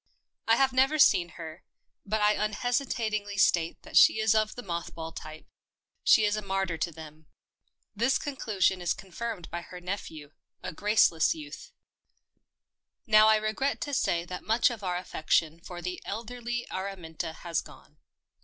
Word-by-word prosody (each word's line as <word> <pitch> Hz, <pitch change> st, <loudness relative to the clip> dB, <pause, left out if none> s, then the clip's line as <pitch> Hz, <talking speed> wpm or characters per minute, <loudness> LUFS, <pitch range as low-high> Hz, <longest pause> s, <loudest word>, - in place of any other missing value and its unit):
I 225 Hz, -, +6 dB
have 265 Hz, +1 st, +2 dB
never 270 Hz, +4 st, +3 dB
seen 175 Hz, -, +4 dB
her, 160 Hz, 0 st, -9 dB, 0.4 s
but 215 Hz, +1 st, 0 dB
I 210 Hz, 0 st, +5 dB
unhesitatingly 215 Hz, -2 st, -1 dB
state 170 Hz, -3 st, +2 dB
that -, -, -11 dB
she -, -, +8 dB
is 220 Hz, 0 st, +3 dB
of 215 Hz, -1 st, +1 dB
the 245 Hz, -, -7 dB
moth 170 Hz, -3 st, -5 dB
ball 165 Hz, 0 st, -6 dB
type 155 Hz, -1 st, -10 dB, 0.3 s
— -, -, -55 dB
she 215 Hz, -, +7 dB
is 205 Hz, 0 st, +1 dB
a 215 Hz, -, -3 dB
martyr 195 Hz, -3 st, -1 dB
to 170 Hz, -, -1 dB
them. 155 Hz, -1 st, -12 dB, 0.7 s
This 235 Hz, +6 st, +2 dB
conclusion 205 Hz, -, 0 dB
is 175 Hz, -, 0 dB
con 195 Hz, -1 st, -14 dB
firmed 220 Hz, -3 st, -5 dB
by 170 Hz, +1 st, -4 dB
her 180 Hz, +1 st, -10 dB
nephew 170 Hz, -5 st, -6 dB, 0.2 s
— -, -, -46 dB
a -, -, -5 dB
graceless 210 Hz, -, +3 dB
youth. 315 Hz, +10 st, -10 dB, 1.3 s
Now 215 Hz, 0 st, +6 dB
I 220 Hz, -, +6 dB
regret 215 Hz, +6 st, -1 dB
to 290 Hz, -, -4 dB
say 170 Hz, -10 st, +1 dB
that 180 Hz, 0 st, -6 dB
much 225 Hz, +4 st, +3 dB
of 225 Hz, -4 st, -8 dB
our 180 Hz, -1 st, -1 dB
affec 170 Hz, -3 st, -8 dB
tion 160 Hz, 0 st, +3 dB
for 175 Hz, +1 st, -9 dB
the 180 Hz, +1 st, -4 dB
elderly 240 Hz, +3 st, -4 dB
Araminta 180 Hz, -5 st, -5 dB
has 170 Hz, -1 st, -2 dB
gone. -, -, -17 dB
200 Hz, 170 wpm, -28 LUFS, 170-225 Hz, 1.3 s, she